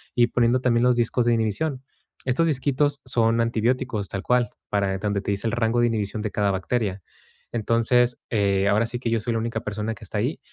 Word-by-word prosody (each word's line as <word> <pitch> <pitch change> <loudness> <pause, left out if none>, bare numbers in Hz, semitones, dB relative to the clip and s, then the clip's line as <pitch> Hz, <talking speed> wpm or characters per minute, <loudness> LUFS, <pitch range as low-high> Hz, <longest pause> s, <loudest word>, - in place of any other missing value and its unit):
Y 120 -1 +4
poniendo 120 +1 +2
también 120 -2 +2
los 125 0 +4
discos 120 +1 +1
de 120 - +3
inhibición. 120 +5 -1 0.4
Estos 130 +6 +2
disquitos 145 0 0
son 115 -2 +2
antibióticos, 115 -1 0
tal 95 - -4
cual, 125 -1 +2 0.2
para 100 -2 0
donde 100 -1 -1
te 100 - -2
dice 100 +3 -1
el - - 0
rango 115 0 +1
de 120 - +4
inhibición 105 -1 -2
de 110 - -2
cada 100 -1 +1
bacteria. 100 0 -2 0.5
Entonces, 120 +2 +2
eh, 100 -3 +1
ahora 105 +3 +3
sí 120 +1 -4
que 120 - -2
yo 115 - +1
soy 115 +2 -2
la 115 - 0
única 115 0 -2
persona 105 +2 -3
que - - -14
está - - -4
ahí. - - -1
115 Hz, 210 wpm, -24 LUFS, 105-125 Hz, 0.5 s, Y